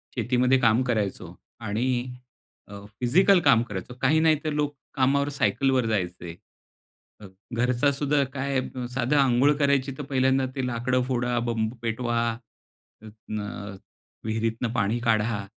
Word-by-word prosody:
शेतीमध्ये 125 +1 +2
काम 115 -1 +3
करायचो 100 -7 -2 0.3
आणि 110 +5 -1 0.8
अ, 100 0 -10
फिजिकल 180 +10 +4
काम 135 -7 +4
करायचो, 100 +4 -6
काही 150 +4 +3
नाही 160 -1 +4
तर 155 - -1
लोक 145 -1 -1 0.2
कामावर 140 +1 +2
सायकलवर 135 -2 +1
जायचे. 90 -5 -3 0.9
अ, - - -10 0.3
घरचा 125 +4 +2
सुद्धा 140 +1 +1
काय 135 0 -1 0.4
साधं 130 +3 +1
अंघोळ 135 +1 +4
करायची, 140 -2 +1
तर 145 - -5
पहिल्यांदा 130 -1 +1
ते 130 -2 -2
लाकडं 125 +1 0
फोडा, 125 -1 0
बंब 110 -1 -1
पेटवा, 120 +1 -1 1.1
न 105 -1 -5 0.5
विहिरीतन 115 +1 -2
पाणी 115 0 0
काढा. 110 -3 0
125 Hz, 125 wpm, -25 LUFS, 110-135 Hz, 1.1 s, फिजिकल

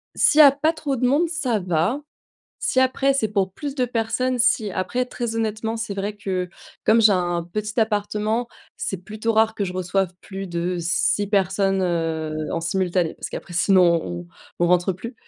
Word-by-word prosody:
S'il 305 - +4
y - - +12
a 280 - +9
pas 310 +4 +1
trop 290 -3 -2
de 250 0 0
monde, 295 +7 +3
ça 280 -10 -1
va. 180 - 0 0.6
Si 260 - +1
après, 265 +1 +2
c'est 225 -5 +1
pour 195 -3 0
plus 285 +6 -6
de 255 - +2
personnes, 250 +2 -1
si. 220 -5 +2
Après, 215 +7 -1
très 235 -2 -4
honnêtement, 220 0 -2
c'est 220 -2 -4
vrai 200 +1 -3
que, 185 -3 -3 0.4
comme 225 +2 +5
j'ai 215 -2 +6
un 175 -2 0
un 170 - -3
petit 215 +6 -5
appartement, 215 +2 0 0.3
c'est 195 - -3
plutôt 215 +2 -2
rare 220 0 +3
que 205 - -1
je 180 - -4
reçoive 185 0 -1
plus 195 -1 -7
de 175 +1 -2
6 175 +4 +1
personnes, 195 -1 +1
heu, 165 -3 -1 0.2
en 165 - -1
simultané 175 -1 0
parce - - -7
qu'après - - -8
sinon, 175 -1 +4
on 85 -1 -6 0.3
on 175 - +3
rentre 180 +2 +3
plus. 230 +7 -8
205 Hz, 190 wpm, -22 LUFS, 180-230 Hz, 0.6 s, y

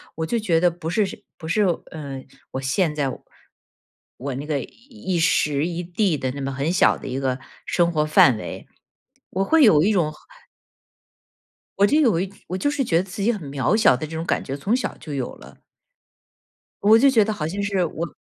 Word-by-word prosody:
我 160 - -3
就 235 +8 -1
觉 180 -7 +1
得 175 - +4
不 170 -1 -8
是 190 +5 +2
是 190 - -9
不 160 - -8
是， 210 +6 +2 0.3
呃， 140 -4 -7 0.3
我 130 - -4
现 150 +5 0
在 145 -3 -1
我 - - -9 0.9
我 135 0 -4
那 140 - -5
个 150 -2 -1
一 220 - -6
时 150 -2 +2
一 175 0 -3
地 180 +1 0
的 130 -2 -2
那 140 +2 -6
么 135 0 -3
很 140 +4 -1
小 185 - +4
的 - - -9
一 130 0 -3
个 130 -1 -1 0.3
生 170 -1 +1
活 155 -2 +1
范 130 -6 +5
围， - - -8 0.6
我 190 - 0
会 320 +9 +4
有 160 - +6
一 200 +7 +3
种 170 -7 +1 1.6
我 200 - +5
就 300 +2 +3
有 230 - +3
一 190 +1 -3 0.2
我 185 - -3
就 190 - 0
是 290 -1 0
觉 165 -9 +1
得 175 - +2
自 190 +1 -7
己 220 +4 +3
很 210 -5 -5
渺 140 +8 +1
小 215 - +5
的 130 - -4
这 160 +1 -8
种 160 +1 -3
感 - - 0
觉， 135 - -5
从 195 +12 0
小 255 - -3
就 150 - -8
有 130 -3 -3
了。 - - -15 1.3
我 215 +2 +7
就 275 +3 +5
觉 225 -5 +4
得 220 - -2
好 160 -8 -3
像 200 +4 -3
是 195 -3 0
我 165 +1 -5
170 Hz, 230 characters per minute, -22 LUFS, 145-200 Hz, 1.6 s, 我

